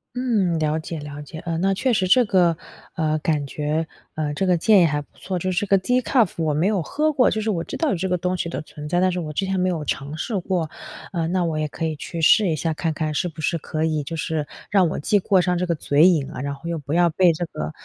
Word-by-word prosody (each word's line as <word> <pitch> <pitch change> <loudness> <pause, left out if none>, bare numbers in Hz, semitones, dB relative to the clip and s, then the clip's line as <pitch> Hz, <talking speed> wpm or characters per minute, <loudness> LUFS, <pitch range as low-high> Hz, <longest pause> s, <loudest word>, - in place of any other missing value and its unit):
嗯， 215 -9 +1
了 155 0 0
解 160 0 -6
了 145 0 -7
解， 150 +2 -9
呃， 165 -1 -3
那 195 +2 +2
确 250 +5 +1
实 190 -4 +1
这 245 +6 +5
个， 175 -5 +3 0.4
呃， 155 -3 0
感 150 -2 0
觉， 150 +3 -2 0.3
呃， 150 -2 -2
这 190 +6 -1
个 180 -1 +4
建 200 +3 +5
议 - - +6
还 150 -2 0
不 145 - -19
错， 185 -1 -4
就 185 +2 -1
是 175 - +1
这 205 - -3
个 195 - +5
decaf 250 +1 +2
我 160 -2 0
没 155 +4 +1
有 200 -2 +2
喝 305 - 0
过， 260 -3 +4
就 220 - -1
是 215 0 0
我 170 -4 -2
知 - - -6
道 320 - +1
有 - - +1
这 190 +2 -2
个 180 - +1
东 180 +1 -1
西 170 -1 -3
的 - - -4
存 150 -1 -9
在， 175 - +1
但 185 0 +3
是 180 - -2
我 155 -3 -4
之 195 +6 -1
前 190 0 -1
没 185 0 +2
有 160 -4 -2
尝 140 +2 -3
试 200 +5 -2
过。 175 -3 -1 0.4
呃， 170 -3 -1
那 180 +1 0
我 160 -2 -1
也 155 - 0
可 165 - -4
以 160 -1 -2
去 165 +3 -6
试 200 +4 +5
一 160 - +1
下 160 +1 -1
看 160 +1 -2
看 155 0 -2
是 180 - 0
不 160 -1 -9
是 170 +2 0
可 155 +1 -3
以 155 -2 0
就 155 +4 -5
是 160 -2 -2 0.2
让 190 -3 +4
我 - - -3
既 205 +8 +2
过 190 0 +3
上 180 0 +1
这 180 +1 -1
个 170 - +1
嘴 150 +2 +4
瘾 155 -7 +2
啊， - - -6
然 140 0 -3
后 140 +4 -10
又 170 -1 -2
不 145 0 -5
要 175 0 +4
被 180 +2 +4
这 165 +2 -3
个 75 - -5
170 Hz, 325 characters per minute, -22 LUFS, 155-185 Hz, 0.4 s, 议